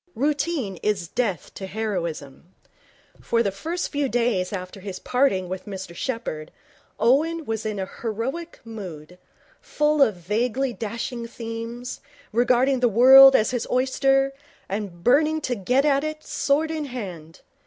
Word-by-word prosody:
Routine 285 - -1
is 195 -2 -1
death 200 - -2
to 190 - -7
heroism. 175 -7 -4 0.7
For 230 0 +1
the 200 - 0
first 330 - -3
few 285 -2 0
days 230 -7 0
after 185 -1 -6
his 190 -1 -6
parting 245 -6 +1
with 185 +2 -6
Mr 190 -3 -7
Sheppherd, 170 - -4 0.5
Owen 310 +7 +2
was 220 -2 -3
in 210 -1 -3
heroic 230 - -4
mood, 180 -7 -9 0.4
full 300 0 +1
of 220 -7 +4
vaguely 240 +8 -1
dashing 235 +2 -5
schemes, 230 +1 -6 0.3
regarding 250 +3 +3
the 245 -1 +3
world 265 +4 +9
as 215 - +3
his 245 -2 -2
oyster, 270 +1 +2 0.3
and 195 -4 -5
burning 310 +5 +3
to 255 - -1
get 250 +6 +1
at 280 -1 +3
it, 310 0 -4
sword 305 +3 0
in 310 -2 -3
hand. 180 - -8
235 Hz, 140 wpm, -24 LUFS, 195-270 Hz, 0.7 s, world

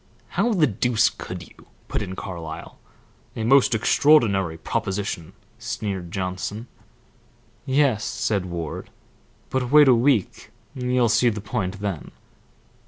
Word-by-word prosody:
"How 220 +6 +1
the 170 -7 +4
deuce 120 -1 +2
could - - -8
you?" - - -20 0.2
put - - -2
in 95 - -5
Carlyle. 85 -5 -7 0.6
"A 110 - -3
most 130 0 +5
extraordinary 105 - +3
proposition," 95 0 -3 0.3
sneered 95 -4 -4
Johnson. 95 +4 -4 1.0
"Yes," 130 -6 +2
said 100 -4 -1
Ward; 85 -3 -5 0.6
"but 130 -2 -1
wait 150 +1 +7
a 130 - +7
week 120 -4 +1 0.2
you'll 125 -1 +1
see 120 +2 +4
the 105 -2 -3
point 100 -1 -3
then." 100 -6 -4
105 Hz, 120 wpm, -23 LUFS, 95-125 Hz, 1.0 s, wait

